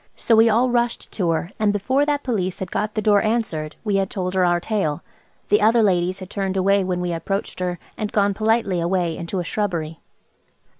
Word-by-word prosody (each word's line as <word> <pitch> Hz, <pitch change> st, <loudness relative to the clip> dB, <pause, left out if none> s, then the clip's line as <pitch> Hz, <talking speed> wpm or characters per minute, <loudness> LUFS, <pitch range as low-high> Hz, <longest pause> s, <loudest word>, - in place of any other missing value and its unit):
So 230 Hz, -, +2 dB
we 225 Hz, +1 st, +6 dB
all 240 Hz, +3 st, +3 dB
rushed 240 Hz, 0 st, -1 dB
to 180 Hz, -5 st, -1 dB
her, 165 Hz, +2 st, -1 dB
and 215 Hz, -1 st, +3 dB
before 260 Hz, +8 st, +1 dB
that 290 Hz, -1 st, 0 dB
Police 190 Hz, -8 st, -1 dB
had 185 Hz, -2 st, -6 dB
got 210 Hz, 0 st, -2 dB
the 215 Hz, -, -1 dB
door 205 Hz, -2 st, +4 dB
answered 205 Hz, -10 st, -2 dB
we 205 Hz, -3 st, +1 dB
had 195 Hz, -1 st, 0 dB
told 185 Hz, -2 st, -3 dB
her 190 Hz, -1 st, +2 dB
our 175 Hz, -1 st, +3 dB
tale. 175 Hz, -6 st, -2 dB, 0.5 s
The 210 Hz, -, +4 dB
other 225 Hz, +2 st, +4 dB
ladies 185 Hz, -1 st, +1 dB
had 185 Hz, -, -8 dB
turned 195 Hz, -1 st, -2 dB
away 195 Hz, +1 st, +3 dB
when 180 Hz, -1 st, -2 dB
we 175 Hz, -1 st, -2 dB
approached 195 Hz, +5 st, -3 dB
her, 180 Hz, -1 st, -2 dB, 0.2 s
and 210 Hz, -1 st, -3 dB
gone 200 Hz, -1 st, +2 dB
politely 215 Hz, -3 st, +1 dB
away 170 Hz, -1 st, 0 dB
into 170 Hz, +3 st, -5 dB
a 180 Hz, -, -1 dB
shrubbery. 170 Hz, -5 st, -3 dB
195 Hz, 210 wpm, -22 LUFS, 180-215 Hz, 0.5 s, we